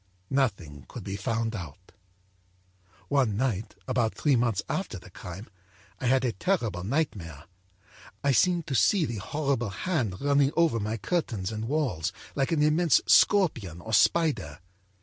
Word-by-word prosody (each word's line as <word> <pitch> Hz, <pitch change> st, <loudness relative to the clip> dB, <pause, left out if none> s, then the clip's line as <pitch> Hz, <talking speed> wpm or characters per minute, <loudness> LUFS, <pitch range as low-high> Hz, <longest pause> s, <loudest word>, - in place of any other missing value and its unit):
Nothing 100 Hz, -, -1 dB
could -, -, -8 dB
be 95 Hz, -, -4 dB
found 115 Hz, +2 st, -2 dB
out. 90 Hz, -1 st, -9 dB, 1.2 s
âOne 130 Hz, -7 st, +2 dB
night, 110 Hz, -3 st, -2 dB
about 120 Hz, -4 st, 0 dB
three 145 Hz, -3 st, +2 dB
months 120 Hz, -4 st, +1 dB
after -, -, -3 dB
the -, -, -14 dB
crime, 95 Hz, +5 st, -9 dB, 0.5 s
I 125 Hz, -, -2 dB
had 130 Hz, +1 st, +3 dB
a 120 Hz, -, +1 dB
terrible 110 Hz, -, -1 dB
nightmare. 95 Hz, -, -2 dB, 0.8 s
I 140 Hz, -, +3 dB
seemed 175 Hz, +4 st, +3 dB
to 140 Hz, -, -4 dB
see 175 Hz, +6 st, +3 dB
the 120 Hz, -5 st, -4 dB
horrible 135 Hz, +1 st, -1 dB
hand 115 Hz, -, -2 dB
running 140 Hz, 0 st, +2 dB
over 165 Hz, -9 st, +3 dB
my 110 Hz, +2 st, -2 dB
curtains 110 Hz, -, -2 dB
and 110 Hz, 0 st, -4 dB
walls 120 Hz, -, -1 dB, 0.2 s
like 135 Hz, +1 st, 0 dB
an 155 Hz, -3 st, +2 dB
immense 155 Hz, +2 st, +4 dB
scorpion 120 Hz, -, +3 dB
or 110 Hz, +5 st, -7 dB
spider. 100 Hz, -, +2 dB
120 Hz, 150 wpm, -27 LUFS, 100-145 Hz, 1.2 s, immense